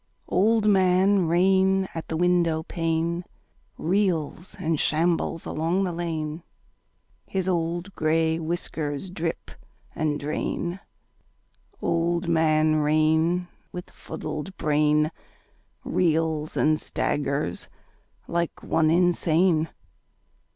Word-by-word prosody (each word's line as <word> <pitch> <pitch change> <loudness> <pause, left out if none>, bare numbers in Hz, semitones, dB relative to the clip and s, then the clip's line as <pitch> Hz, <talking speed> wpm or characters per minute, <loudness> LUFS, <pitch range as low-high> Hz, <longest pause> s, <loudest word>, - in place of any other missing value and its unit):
Old 220 +2 +3
Man 190 -1 +4
Rain 190 +2 +3
at 165 - -6
the 160 - -2
windowpane 170 -1 +1 0.5
Reels 175 -2 -1
and 160 -2 -1
shambles 165 +1 +1
along 170 +5 0
the 185 - -1
lane: 165 -2 -3 0.9
His 190 -1 -2
old 175 +1 -1
gray 160 0 +1
whiskers 160 -1 -3
drip 165 -2 -4 0.4
and 150 -1 -1
drain: 170 +4 -3 1.0
Old 170 +1 0
Man 155 -1 +3
Rain 160 +4 +2 0.2
with 180 0 -8
fuddled 155 +3 -6
brain 150 +1 +2 0.7
Reels 160 -3 0
and 155 0 +3
staggers 140 -10 -1 0.6
like 170 0 -2
one 160 -1 +2
insane. 170 -1 +3
165 Hz, 90 wpm, -25 LUFS, 155-180 Hz, 1.0 s, Man